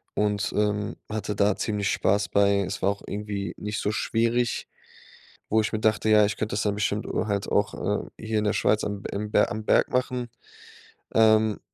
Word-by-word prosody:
und, 105 -1 0
ähm, 105 +1 0
hatte 105 -1 -3
da 100 0 +2
ziemlich 100 -3 -1
Spaß 100 +2 +1
bei. 100 0 +3
Es 95 +1 -4
war 95 - +3
auch 100 - -7
irgendwie 100 -1 -4
nicht 105 0 -4
so 105 - 0
schwierig, 115 +2 0 0.8
wo 110 - +3
ich 105 - -3
mir 110 - 0
dachte, 110 0 +1
ja, 105 -1 +6
ich 105 0 -2
könnte 110 -1 -3
das 105 - 0
dann 105 -1 0
bestimmt, 105 +1 -1
äh, - - -2
halt 100 -2 -2
auch, - - +1 0.3
äh, - - -13
hier 110 0 -1
in 105 - -1
der 105 - +2
Schweiz 110 - +2
am 100 -1 -4
im 105 +1 -3
am 105 +1 +2
Berg - - +3
machen. 125 -1 -1 0.9
Ähm 110 -1 +4
105 Hz, 195 wpm, -26 LUFS, 100-110 Hz, 0.9 s, ja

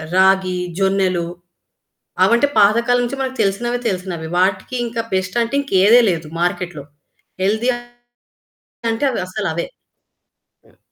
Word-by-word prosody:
రాగి, 190 -1 +3 0.2
జొన్నలు, 190 -3 +1 1.0
అవంటే 235 +7 +3
పాత 205 +1 +6
కాలం 245 0 +3
నుంచి 270 +3 -5
మనకు 260 0 -3
తెలిసినవి 240 +5 -1
తెలిసినవి. 180 -4 -4
వాటికింకా 230 +5 -1
బెస్ట్ 185 +3 -2
అంటే 235 +4 -3
ఇంకేదే 225 -2 +5
లేదు 165 -2 -4
మార్కెట్‌లో. 175 -4 -2 0.6
హెల్తీ 220 +6 +1 1.2
అంటే 225 +5 -1
అవసలవే. 185 -4 -3 1.0
హ్మ్. - - -26
195 Hz, 105 wpm, -19 LUFS, 185-235 Hz, 1.2 s, పాత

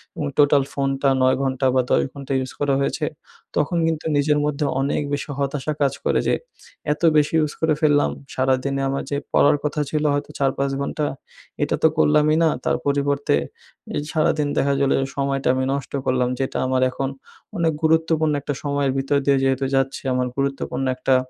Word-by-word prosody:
এবং 150 - -3
টোটাল 145 -1 +5
ফোনটা 135 0 0
৯ 130 0 +3
ঘন্টা 135 0 -1
বা 130 - +5
১০ - - +4
ঘন্টা 140 -1 -5
ইউজ 130 0 -4
করা 145 -1 +1
হয়েছে, 140 - -1 0.5
তখন 150 +3 +1
কিন্তু 160 -1 -2
নিজের 150 +1 +2
মধ্যে 150 0 -1 0.2
অনেক 140 +2 0
বেশি 145 +1 -3
হতাশা 140 +2 -2
কাজ 140 -1 +2
করে - - +2
যে - - +3 0.6
এত 150 - -13 0.2
বেশি 150 +1 +2
ইউজ 150 -2 0
করে 160 -1 +3
ফেললাম! 145 -2 +3 0.3
সারাদিনে 135 +1 0
আমার 135 0 -2
যে 140 - 0 0.2
পড়ার 145 - +5
কথা 150 0 -1
ছিল 150 -1 0
হয়তো 145 0 -2
৪-৫ 140 0 0
ঘন্টা 150 +2 -2 0.6
এটা - - 0
তো - - +8
করলামই 150 0 +4
না - - +5 0.2
তার - - +2
পরিবর্তে 140 0 +1 0.6
এই - - 0
সারাদিন 155 -2 +1
দেখা 140 0 +2
গেলে 140 - +3
যে - - 0
সময়টা 135 -1 -1
আমি 130 - 0
নষ্ট 140 -2 -4
করলাম 125 -1 +1
যেটা 135 - -2
আমার 130 0 +1
এখন 135 +1 -2 0.5
অনেক 165 -2 +1
গুরুত্বপূর্ণ 160 -1 +2
একটা 145 - -3
সময়ের 140 -2 0
ভিতর 135 +1 +1
দিয়ে 140 -1 +4
যেহেতু 135 0 +1
যাচ্ছি। 135 0 0
আমার 125 0 0
গুরুত্বপূর্ণ 135 -1 -2
একটা 130 +1 +2
140 Hz, 180 wpm, -22 LUFS, 135-150 Hz, 0.6 s, তো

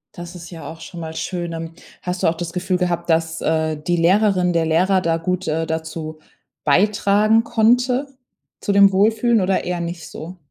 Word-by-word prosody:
Das 175 0 -9
ist 170 -1 -10
ja 165 -5 -9
auch 160 0 -10
schon 170 +1 -9
mal 160 -1 -6
schön. 175 0 -4
Ähm, 165 0 -6 0.3
hast 180 0 -4
du - - +4
auch 165 - +1
das 170 -1 -5
Gefühl 185 0 -1
gehabt, 175 -1 -2
dass, 160 0 +1
äh, 160 -1 0
die 175 +4 -1
Lehrerin 185 +1 +3
der 165 -1 +1
Lehrer 185 +4 +2
da 165 -2 +1
gut, 180 +2 -2
äh, 160 +1 0
dazu 160 -1 -5 0.4
beitragen 205 +6 +3
konnte 245 +5 +2 0.5
zu - - -1
dem 200 0 +6
Wohlfühlen 220 +3 +3
oder 190 +1 +1
eher 180 0 -3
nicht 170 0 -5
so? 175 +4 -9
175 Hz, 190 wpm, -20 LUFS, 165-195 Hz, 0.5 s, dem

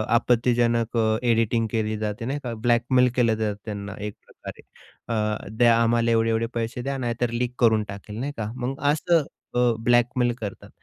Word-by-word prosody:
आपत्तिजनक 120 -1 +2
अ, 110 -1 +2
एडिटिंग 115 0 +2
केली 110 -1 -1
जाते 105 +1 -4
नाही 140 +3 -2
का, 120 -2 -4
ब्लॅकमेल 120 +2 +3
केलं 115 -3 +3
जातं 105 -2 -1
त्यांना 100 -2 -6
एक 105 0 -5
प्रकारे. - - -11 0.5
अ, 105 -1 -1
द्या 120 -1 +5
आम्हाला 115 0 +2
एवढे-एवढे 115 0 +2
पैसे 115 +1 -3
द्या, 135 +1 -3
नाहीतर 120 -1 -1
लीक 120 +1 -2
करून 110 -3 +4
टाकेल 100 +2 -8
नाही 140 +3 -3
का. 110 -1 -3
मग 130 +2 -4
असं 165 +1 +2 0.3
अ, 125 -1 +3
ब्लॅकमेल 120 0 +3
करतात. 100 -3 -7
115 Hz, 165 wpm, -24 LUFS, 110-120 Hz, 0.5 s, द्या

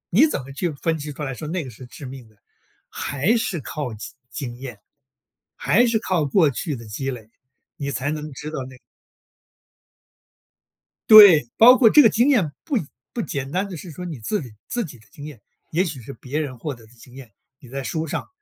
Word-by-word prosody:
你 265 - +6
怎 300 - -3
么 135 +2 -11
去 170 +6 -2
分 160 +3 -2
析 150 0 -6
出 150 - -7
来 135 -2 -3
说 140 +5 -7
那 170 +2 -2
个 130 - -8
是 125 +2 -12
致 135 +4 -11
命 130 -2 -9
的， 110 - -25 0.5
还 155 - 0
是 195 -8 -2
靠 135 -2 -5
经 105 0 -9 0.2
经 125 -4 -6
验。 125 -4 -8 0.8
还 240 +7 +3
是 230 -2 +1
靠 180 -7 0
过 155 +2 +3
去 145 +3 -3
的 115 -2 -10
积 135 +6 -4
累， 115 -4 -9 0.5
你 140 -1 -3
才 130 +2 -2
能 155 0 -5
知 150 +3 -7
道 145 -4 -4
那 130 0 -11
个。 - - -19 2.3
对。 200 - +10
包 250 +3 +9
括 235 -4 +6
这 300 - +8
个 230 - +6
经 235 +6 +3
验， 200 - +2
不 290 -5 0 0.4
不 235 - -2
简 140 -5 -4
单 185 +5 -1
地 180 - -7
是 170 +2 -9
说， 180 +4 -8
你 160 -7 -6
自 205 - -2
己 125 -5 -10 0.2
自 240 -2 -2
己 145 -6 -11
的 110 - -22
经 145 - -10
验。 150 -8 -10 0.3
也 175 +4 +1
许 150 -7 -6
是 115 - -9
别 135 +4 -5
人 140 -5 -4
获 145 +5 -4
得 115 -2 -17
的 110 - -22
经 125 +1 -17
验。 130 -4 -12 0.3
你 130 -6 -15
在 135 +2 -5
书 155 +7 -3
上， 155 - -4
145 Hz, 235 characters per minute, -22 LUFS, 130-180 Hz, 2.3 s, 对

